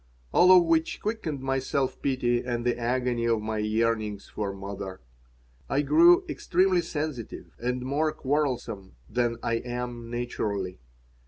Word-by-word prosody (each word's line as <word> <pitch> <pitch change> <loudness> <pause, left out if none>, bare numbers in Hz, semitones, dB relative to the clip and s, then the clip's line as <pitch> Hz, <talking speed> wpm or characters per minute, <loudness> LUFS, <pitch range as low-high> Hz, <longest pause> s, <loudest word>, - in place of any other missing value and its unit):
All 180 +1 +7
of 180 -1 +8
which 165 -1 +1
quickened 205 - -3
my 135 0 0
self 130 0 -1
pity 120 -3 +1
and 120 -1 -3
the 120 - +2
agony 120 0 0
of 115 -1 +2
my 110 0 -3
yearnings 110 -1 0
for 105 -2 -3
mother. 95 -1 -7 0.7
I 140 +2 +1
grew 345 - +6
extremely 185 0 +2
sensitive 150 -7 -5
and 125 +1 -2
more 145 +4 0
quarrelsome 130 - -2
than 120 -1 0
I 115 - +1
am 120 -1 -5
naturally. 105 - -3
125 Hz, 140 wpm, -27 LUFS, 115-145 Hz, 0.7 s, of